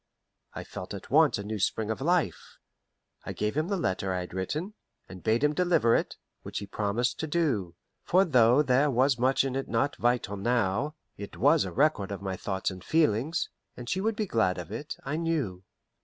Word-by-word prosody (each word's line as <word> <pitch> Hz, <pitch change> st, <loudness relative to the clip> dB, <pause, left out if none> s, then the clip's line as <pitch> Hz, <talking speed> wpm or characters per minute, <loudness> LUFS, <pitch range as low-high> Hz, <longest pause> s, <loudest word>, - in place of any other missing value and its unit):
I -, -, -5 dB
felt 90 Hz, +2 st, -7 dB
at 100 Hz, -, -10 dB
once 150 Hz, -2 st, +5 dB
a 100 Hz, -, -5 dB
new 105 Hz, +1 st, -4 dB
spring 110 Hz, +3 st, 0 dB
of 110 Hz, -, -4 dB
life. 175 Hz, +3 st, 0 dB, 0.7 s
I -, -, -5 dB
gave 105 Hz, +3 st, -2 dB
him 155 Hz, +2 st, 0 dB
the 200 Hz, 0 st, -1 dB
letter 95 Hz, -, -1 dB
I 90 Hz, 0 st, -1 dB
had 90 Hz, -, -8 dB
written, 150 Hz, -, -3 dB, 0.3 s
and 95 Hz, -1 st, -10 dB
bade 115 Hz, +5 st, +1 dB
him 150 Hz, 0 st, +3 dB
deliver 165 Hz, -9 st, +3 dB
it, -, -, -1 dB, 0.2 s
which -, -, -7 dB
he 100 Hz, -, -3 dB
promised 110 Hz, +4 st, -1 dB
to 160 Hz, -, -2 dB
do; 130 Hz, -, 0 dB, 0.3 s
for 185 Hz, +2 st, +3 dB
though 125 Hz, -2 st, +5 dB
there 135 Hz, +2 st, +3 dB
was 130 Hz, 0 st, +2 dB
much 130 Hz, +2 st, +3 dB
in 135 Hz, -1 st, -2 dB
it 135 Hz, -, -2 dB
not 120 Hz, +5 st, 0 dB
vital 120 Hz, -4 st, 0 dB
now, 120 Hz, +6 st, 0 dB, 0.2 s
it 100 Hz, -, -8 dB
was 145 Hz, +4 st, +4 dB
a -, -, -5 dB
record 135 Hz, -9 st, +1 dB
of 100 Hz, -, -4 dB
my 95 Hz, -1 st, -4 dB
thoughts 95 Hz, +1 st, -2 dB
and 95 Hz, -1 st, -10 dB
feelings, 155 Hz, 0 st, +1 dB, 0.3 s
and 120 Hz, -, -8 dB
she 185 Hz, +9 st, -1 dB
would 220 Hz, +1 st, 0 dB
be 215 Hz, -, -1 dB
glad 110 Hz, -, +1 dB
of 90 Hz, +2 st, -7 dB
it, 145 Hz, +7 st, -5 dB
I 140 Hz, +3 st, -2 dB
knew. 150 Hz, -, -2 dB
120 Hz, 205 wpm, -28 LUFS, 100-150 Hz, 0.7 s, once